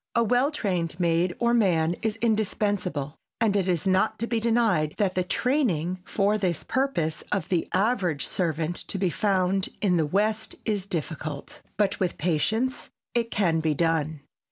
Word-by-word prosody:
A 235 - +4
well 245 +5 +3
trained 180 - -2
maid 175 +1 +2
or 235 0 +2
man 175 -7 +3
is 220 -2 0
indispensable, 205 -9 0 0.2
and 220 -3 +2
it 195 -2 +1
is 175 -2 0
not 190 +3 +2
to 230 - -2
be 235 -1 0
denied 220 -10 +2
that 195 -3 +1
the 185 - +1
training, 185 - 0
for 205 +3 +1
this 180 -4 -1
purpose, 215 - -1
of 195 -6 -1
the 175 -3 +1
average 185 - +1
servant 165 -1 -1
to - - -3
be 185 -2 +1
found 190 0 +1
in 185 -4 +2
the 160 -2 +1
West 215 +5 0
is 205 -3 -1
difficult. 155 -4 -5 0.2
But 205 -1 +1
with 180 -2 -1
patience 215 - 0 0.2
it 235 -1 0
can 175 -7 +1
be 155 -1 0
done. 160 -2 0
190 Hz, 165 wpm, -26 LUFS, 165-220 Hz, 0.2 s, A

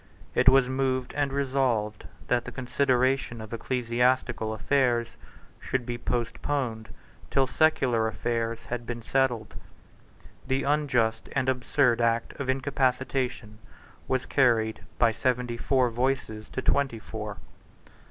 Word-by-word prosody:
It - - +6
was 135 -1 +5
moved 130 -1 -1
and 145 -1 0
resolved 130 -6 0 0.2
that 120 -1 +1
the - - -6
consideration 130 -1 +1
of 110 +1 -8
ecclesiastical 120 -1 0
affairs 120 0 +1 0.5
should 130 -2 -2
be 120 0 -4
postponed 120 -1 -2 0.4
till 135 -1 +3
secular 130 -6 +2
affairs 115 +2 -2
had 120 +1 -5
been 120 -1 -5
settled. 125 -4 0 0.9
The 135 +1 0
unjust 125 -7 +1
and 135 -2 0
absurd 125 -1 +2
Act 115 0 +1
of 135 -2 -3
Incapacitation 130 -4 -1 0.5
was 130 0 0
carried 115 -5 +2 0.2
by 115 -1 +4
seventy 125 +1 -1
four 130 0 +2
voices 120 -3 -2
to 130 - -4
twenty 140 -5 +1
four. 105 -2 -7
125 Hz, 120 wpm, -27 LUFS, 115-130 Hz, 0.9 s, It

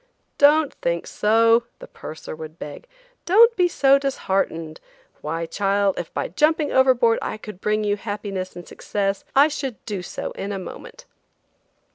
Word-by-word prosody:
"Don't 295 +1 +5
think 170 0 -1
so," 230 +2 +3
the - - -11
purser 155 0 -9
would 155 +1 -9
beg; 150 - -9 0.4
"don't 455 +6 +6
be 360 -3 +3
so 275 -5 +4
disheartened; 190 - -2 0.4
why, 165 +2 -3
child, 200 +1 0
if 170 - -6
by - - -2
jumping 300 - +1
overboard 255 -3 +4
I - - -4
could 210 -3 -10
bring 215 0 0
you 205 0 0
happiness 205 -3 -5
and 175 -1 -10
success, 200 -1 -3
I 280 +2 +7
should 270 -6 -5
do 205 -4 -4
so 180 - -6
in 200 - -5
a 200 - -3
moment." - - -10
210 Hz, 155 wpm, -22 LUFS, 185-275 Hz, 0.4 s, I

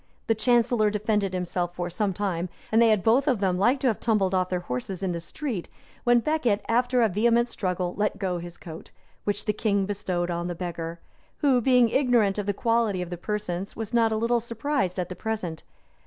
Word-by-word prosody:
The 225 - +3
chancellor 235 -1 +3
defended 210 -1 0
himself 175 -1 -2
for 175 0 -2
some 195 +3 -1
time; 185 -2 -2 0.2
and 225 +1 +5
they 230 - +6
had 210 -4 +2
both 250 +6 +3
of 255 -7 +2
them 185 -2 +1
like 245 +7 +3
to 265 - +2
have 225 - +1
tumbled 205 -5 +1
off 185 -1 +1
their 180 -1 -1
horses 175 +6 -4
in 190 - 0
the 170 - -3
street, 215 - -5 0.4
when 240 0 +5
Becket, 245 -8 0
after 245 +1 +2
a - - +5
vehement 235 +4 +2
struggle, 180 -4 -2
let 210 0 0
go 185 -3 -2
his 175 0 -9
coat; 160 -2 -10 0.4
which 205 0 -2
the 210 - +1
king 200 -2 +1
bestowed 185 -3 -2
on 170 0 -2
the 175 - -4
beggar, 170 -1 -5 0.4
who, 270 -5 +4
being 250 -1 +4
ignorant 235 -6 +2
of 205 - -3
the - - +3
quality 225 -3 +1
of 180 - -9
the - - -2
persons, 195 0 -4
was 225 +1 -5
not 230 -1 +3
a 220 - 0
little 235 +2 +2
surprised 230 -3 -2
at 180 -2 -1
the 180 - -7
present. 190 -8 -4
205 Hz, 215 wpm, -26 LUFS, 180-230 Hz, 0.4 s, they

